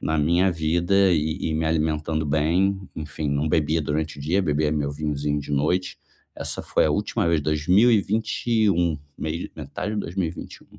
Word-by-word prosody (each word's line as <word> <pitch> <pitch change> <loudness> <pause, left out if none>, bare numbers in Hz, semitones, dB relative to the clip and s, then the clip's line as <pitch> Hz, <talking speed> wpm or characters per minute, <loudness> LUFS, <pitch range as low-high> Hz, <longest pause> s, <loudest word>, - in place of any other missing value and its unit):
na 80 - 0
minha 85 +5 +3
vida 85 +4 +2
e 80 +1 0
e - - -1
me 80 +1 0
alimentando 80 0 0
bem, 85 +7 +1 0.2
enfim, 75 0 -4
não 70 +2 0
bebia 80 +1 +1
durante 75 +1 -2
o - - -8
dia, 90 +7 +1
bebia 75 -2 +1
meu 75 -2 -1
vinhozinho 75 0 -2
de 75 - -7
noite. 80 +6 0 0.4
Essa - - -5
foi - - +2
a - - +1
última - - 0
vez, 85 -2 +2
2021 100 +1 +2 0.2
mei 80 +2 -4
metade 80 +7 -5
de 105 - -1
2021. 85 -2 -6
80 Hz, 160 wpm, -24 LUFS, 75-90 Hz, 0.4 s, minha